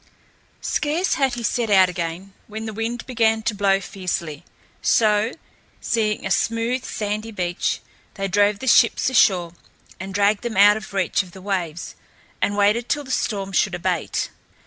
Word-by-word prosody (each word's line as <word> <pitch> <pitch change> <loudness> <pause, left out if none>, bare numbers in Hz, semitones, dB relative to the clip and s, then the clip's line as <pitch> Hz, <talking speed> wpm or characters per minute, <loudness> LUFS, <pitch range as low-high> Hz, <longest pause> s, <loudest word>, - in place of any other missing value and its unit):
Scarce 305 +5 0
had 270 -4 +1
he 240 - -5
set 230 0 0
out 190 -2 +6
again 180 +2 -5
when 220 +1 -6
the 220 - -5
wind 230 +3 -3
began 225 -3 +1
to 230 - 0
blow 195 -1 +2
fiercely; 170 -6 -4 0.4
so, 215 +1 +3 0.5
seeing 215 -2 -1
a 195 - -3
smooth, 230 +5 0
sandy 210 +1 -3
beach, 180 -4 -2 0.3
they 195 0 -2
drove 205 +2 +2
the 260 - -7
ships 245 +2 +4
ashore 180 -8 +3 0.5
and 190 +1 -6
dragged 200 +1 +2
them 235 -4 -4
out 205 +1 +7
of 215 0 -7
reach 190 0 +1
of 180 -3 -13
the 190 - -11
waves, 175 -4 -3 0.5
and 205 - 0
waited 210 +4 +2
till 295 - 0
the 265 - -8
storm 200 -6 -1
should 195 0 +1
abate. 175 -2 -2
205 Hz, 165 wpm, -22 LUFS, 190-230 Hz, 0.5 s, out